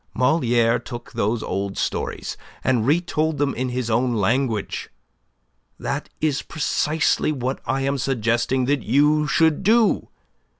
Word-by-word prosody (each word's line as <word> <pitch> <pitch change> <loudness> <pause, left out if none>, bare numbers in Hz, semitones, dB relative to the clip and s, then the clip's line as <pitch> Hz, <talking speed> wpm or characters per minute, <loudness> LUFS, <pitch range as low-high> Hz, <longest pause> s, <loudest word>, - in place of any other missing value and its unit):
Moliere 120 -4 +2
took 120 0 -9
those 115 -1 -1
old 100 0 -3
stories - - -3 0.3
and 125 -3 +1
retold 160 -1 +1
them 140 -1 +1
in 130 +1 -2
his 125 -1 -2
own 120 +2 +1
language. 115 +1 -1 0.9
That - - -4
is 150 -3 0
precisely 155 0 0
what 130 -2 -2
I 135 +3 0
am 135 +1 0
suggesting 120 0 0
that 140 0 +1
you 150 +6 +3
should 160 +2 +3
do. 220 +2 +3
130 Hz, 130 wpm, -22 LUFS, 120-150 Hz, 0.9 s, you